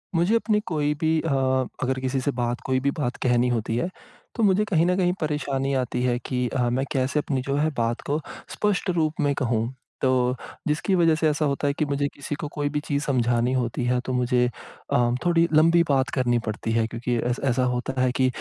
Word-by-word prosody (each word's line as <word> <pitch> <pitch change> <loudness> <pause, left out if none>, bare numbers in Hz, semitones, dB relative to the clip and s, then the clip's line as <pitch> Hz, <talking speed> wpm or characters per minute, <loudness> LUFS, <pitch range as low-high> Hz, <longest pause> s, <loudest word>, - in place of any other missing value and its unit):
मुझे 175 +7 +3
अपनी 215 -2 +2
कोई 150 -3 0
भी 160 0 +2
अ, 165 - -2 0.5
अगर 130 0 0
किसी 130 +1 -1
से 145 - 0
बात 120 0 -1
कोई 130 0 +1
भी 140 +2 +1
बात 125 -4 -1
कहनी 120 0 +3
होती 115 -2 -1
है 175 - -1 0.5
तो 230 - 0
मुझे 205 +1 +3
कहीं 170 -5 +2
न 180 +1 +2
कहीं 180 -1 +2
परेशानी 140 -3 -1
आती 125 0 -3
है 125 -1 +1
कि 125 -1 -1
अ, 125 -2 0
मैं 130 +3 0
कैसे 135 +2 +1
अपनी 140 -4 -1
जो 140 +2 -2
है 155 +2 +2
बात 115 +1 -1
को 145 +2 +1 0.4
स्पष्ट 205 -2 0
रूप 160 -3 +1
में 145 -1 +2
कहूँ। 120 -3 -1 0.3
तो, 125 -1 +2 0.3
जिसकी 155 +6 0
वज़ह 165 -3 +4
से 155 0 +1
ऐसा 150 +1 0
होता 140 0 0
है 140 - +1
कि 155 - +2
मुझे 140 0 0
किसी 145 +1 -5
को - - -3
कोई 145 -1 -2
भी - - +2
चीज़ 145 -1 -2
समझानी 120 -2 +1
होती 125 -1 -1
है, 125 0 +2
तो 130 - -2
मुझे 125 0 +2 0.5
अ, 120 0 +3
थोड़ी 170 -1 +4
लम्बी 165 +2 +5
बात 135 -1 +2
करनी 120 -2 +2
पड़ती 110 +1 -3
है, 115 0 +2
क्योंकि 120 +1 -2
ऐस 125 - -1
ऐसा 130 0 +2
होता 130 +2 -3
है 130 -1 +3
कि 130 - +4
135 Hz, 220 wpm, -24 LUFS, 125-155 Hz, 0.5 s, लम्बी